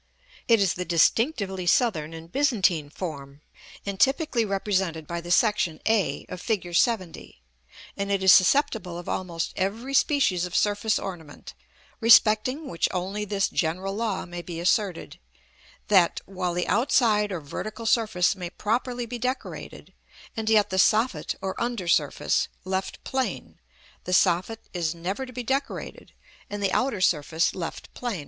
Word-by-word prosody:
It 230 Hz, -2 st, +5 dB
is 195 Hz, -3 st, +2 dB
the 180 Hz, -, -4 dB
distinctively 190 Hz, -, +1 dB
Southern 170 Hz, -, +2 dB
and 165 Hz, +1 st, -10 dB
Byzantine 200 Hz, -, +1 dB
form, 145 Hz, -4 st, -7 dB, 0.4 s
and 200 Hz, -1 st, -4 dB
typically 270 Hz, -, +2 dB
represented 190 Hz, -5 st, -1 dB
by 170 Hz, +2 st, -4 dB
the 175 Hz, -, -9 dB
section 180 Hz, -5 st, +2 dB
a, 220 Hz, -3 st, +1 dB
of 180 Hz, -1 st, -7 dB
Fig. 220 Hz, -5 st, -1 dB
LXX.; 180 Hz, 0 st, -1 dB, 0.6 s
and 200 Hz, 0 st, -3 dB
it 195 Hz, -1 st, 0 dB
is 190 Hz, -, +7 dB
susceptible 190 Hz, -, +3 dB
of 175 Hz, -, -9 dB
almost 170 Hz, -3 st, -3 dB
every 225 Hz, +8 st, -2 dB
species 265 Hz, -, +2 dB
of 180 Hz, -1 st, -4 dB
surface 205 Hz, +1 st, +1 dB
ornament, 165 Hz, -6 st, -8 dB, 0.5 s
respecting 230 Hz, +5 st, +5 dB
which 165 Hz, -, 0 dB
only 195 Hz, +3 st, -3 dB
this 200 Hz, -1 st, 0 dB
general 185 Hz, +4 st, -2 dB
law 215 Hz, -1 st, -2 dB
may 175 Hz, -1 st, -7 dB
be 170 Hz, -1 st, -7 dB
asserted: 185 Hz, +1 st, 0 dB, 0.7 s
that, 185 Hz, -5 st, +4 dB
while 180 Hz, -2 st, -3 dB
the 180 Hz, -, -1 dB
outside 220 Hz, -3 st, +2 dB
or 180 Hz, -, -3 dB
vertical 215 Hz, +10 st, -6 dB
surface 220 Hz, -6 st, +2 dB
may 180 Hz, -3 st, -6 dB
properly 240 Hz, +5 st, -2 dB
be 240 Hz, +1 st, -6 dB
decorated, 255 Hz, +3 st, -5 dB, 0.4 s
and 220 Hz, -1 st, -2 dB
yet 215 Hz, -3 st, +3 dB
the 190 Hz, -, 0 dB
soffit 220 Hz, +6 st, +2 dB
or 190 Hz, 0 st, -2 dB
under 235 Hz, -6 st, -2 dB
surface 150 Hz, -4 st, +1 dB, 0.2 s
left 190 Hz, 0 st, -3 dB
plain, 265 Hz, -1 st, -3 dB, 0.5 s
the 180 Hz, -, -2 dB
soffit 185 Hz, +5 st, +1 dB
is 170 Hz, -2 st, -1 dB
never 190 Hz, +10 st, -4 dB
to -, -, -10 dB
be 250 Hz, 0 st, -5 dB
decorated, 270 Hz, +4 st, -3 dB, 0.4 s
and 205 Hz, 0 st, -5 dB
the 195 Hz, -, +1 dB
outer 250 Hz, -7 st, 0 dB
surface 160 Hz, -1 st, +1 dB
left 175 Hz, -3 st, -6 dB
plain. 240 Hz, -7 st, -4 dB
195 Hz, 150 wpm, -25 LUFS, 175-225 Hz, 0.7 s, is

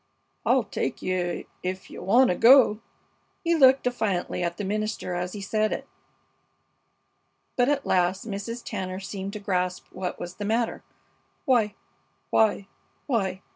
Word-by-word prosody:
"I'll -, -, +4 dB
take -, -, -4 dB
you 180 Hz, -1 st, -1 dB, 0.2 s
ef 185 Hz, +1 st, -4 dB
you -, -, -8 dB
wanta 235 Hz, +2 st, +4 dB
go." 235 Hz, 0 st, +6 dB, 0.6 s
He 340 Hz, -1 st, +2 dB
looked 265 Hz, -4 st, +6 dB
defiantly 220 Hz, -9 st, -1 dB
at 170 Hz, 0 st, -2 dB
the 205 Hz, -, -3 dB
minister 210 Hz, -2 st, -2 dB
as 180 Hz, +1 st, -3 dB
he 205 Hz, -, -6 dB
said 215 Hz, +2 st, 0 dB
it. -, -, -4 dB, 1.7 s
But 245 Hz, +1 st, +3 dB
at 285 Hz, -1 st, 0 dB
last 185 Hz, +3 st, +1 dB
Mrs. 225 Hz, +3 st, -5 dB
Tanner 185 Hz, -3 st, -4 dB
seemed 195 Hz, 0 st, -6 dB
to 210 Hz, -, -5 dB
grasp 180 Hz, -3 st, -1 dB
what 185 Hz, -1 st, -5 dB
was 175 Hz, 0 st, -7 dB
the 205 Hz, -, -4 dB
matter. 225 Hz, +2 st, 0 dB, 0.6 s
"Why! 225 Hz, -6 st, +2 dB, 0.6 s
why! 210 Hz, -3 st, +3 dB, 0.4 s
why! 195 Hz, -8 st, -1 dB
200 Hz, 140 wpm, -26 LUFS, 185-230 Hz, 1.7 s, go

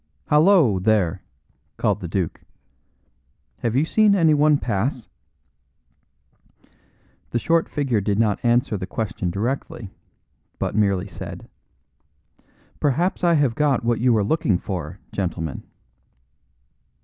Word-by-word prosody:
"Hallo, 150 Hz, -, +4 dB
there!" 100 Hz, -4 st, +1 dB, 0.6 s
called 105 Hz, -4 st, +1 dB
out -, -, -19 dB
the 90 Hz, -, -4 dB
duke. 90 Hz, -1 st, -3 dB, 1.2 s
"Have 115 Hz, 0 st, -1 dB
you 140 Hz, +4 st, +3 dB
seen 210 Hz, +3 st, +3 dB
anyone 155 Hz, -4 st, +4 dB
pass?" 120 Hz, +1 st, -2 dB, 2.2 s
The -, -, -1 dB
short 165 Hz, +7 st, +1 dB
figure 130 Hz, -7 st, 0 dB
did 100 Hz, 0 st, -1 dB
not 105 Hz, -2 st, +1 dB
answer 120 Hz, -2 st, +2 dB
the 95 Hz, -1 st, -5 dB
question 100 Hz, -3 st, -3 dB
directly, 110 Hz, +1 st, -4 dB, 0.7 s
but -, -, -2 dB
merely 100 Hz, -2 st, +1 dB
said: 90 Hz, -, -9 dB, 1.3 s
"Perhaps 170 Hz, +8 st, 0 dB
I 170 Hz, -1 st, +4 dB
have 140 Hz, -6 st, +2 dB
got 140 Hz, -3 st, +1 dB
what 120 Hz, -1 st, +1 dB
you 120 Hz, -1 st, +3 dB
are 105 Hz, -, +2 dB
looking 105 Hz, -, +1 dB
for, 90 Hz, -2 st, -5 dB
gentlemen." 85 Hz, -6 st, -3 dB
115 Hz, 115 wpm, -22 LUFS, 100-145 Hz, 2.2 s, Hallo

